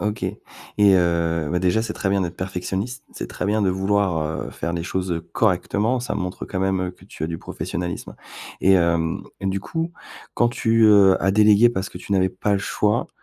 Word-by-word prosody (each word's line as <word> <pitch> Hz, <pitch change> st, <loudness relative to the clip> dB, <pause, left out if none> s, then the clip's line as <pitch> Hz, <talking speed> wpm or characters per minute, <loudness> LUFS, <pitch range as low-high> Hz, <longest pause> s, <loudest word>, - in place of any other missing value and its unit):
OK, 105 Hz, 0 st, -2 dB
et -, -, -2 dB, 0.6 s
heu, 85 Hz, -3 st, +1 dB
bah, 90 Hz, -, +1 dB
déjà 95 Hz, +5 st, +1 dB
c'est 110 Hz, -2 st, -4 dB
très 95 Hz, -, -2 dB
bien 100 Hz, 0 st, +2 dB
d'être 90 Hz, -1 st, -3 dB
perfectionniste. 95 Hz, +6 st, -4 dB
C'est -, -, -6 dB
très -, -, -4 dB
bien 105 Hz, +1 st, +1 dB
de 95 Hz, -, +2 dB
vouloir, 95 Hz, -2 st, +1 dB, 0.3 s
heu, -, -, -8 dB
faire 85 Hz, -, -4 dB
les 85 Hz, -1 st, -2 dB
choses, 95 Hz, -1 st, -3 dB
heu, 85 Hz, -1 st, -1 dB
correctement, 110 Hz, +4 st, +1 dB
ça 120 Hz, -4 st, -3 dB
montre 90 Hz, -2 st, -4 dB
quand 95 Hz, -, -4 dB
même, 95 Hz, -1 st, +1 dB
heu, 90 Hz, -1 st, -2 dB
que -, -, -20 dB
tu -, -, -11 dB
as -, -, -1 dB
du 80 Hz, 0 st, -5 dB
professionnalisme, 85 Hz, 0 st, -5 dB, 0.5 s
et 95 Hz, -, +4 dB
hem, 85 Hz, -2 st, +1 dB, 0.2 s
et 95 Hz, -, -3 dB
du 95 Hz, +1 st, 0 dB
coup, 165 Hz, +8 st, -3 dB, 0.4 s
quand 120 Hz, -, +3 dB
tu, 115 Hz, -1 st, +2 dB
heu, 100 Hz, -3 st, +6 dB
as 95 Hz, -, +2 dB
délégué 105 Hz, +2 st, +6 dB
parce 95 Hz, -4 st, -3 dB
que -, -, -10 dB
tu 100 Hz, -, -6 dB
n'avais 95 Hz, -1 st, +3 dB
pas 95 Hz, +3 st, -2 dB
le 100 Hz, -, +2 dB
choix, 105 Hz, +1 st, 0 dB
95 Hz, 220 wpm, -22 LUFS, 90-105 Hz, 0.6 s, heu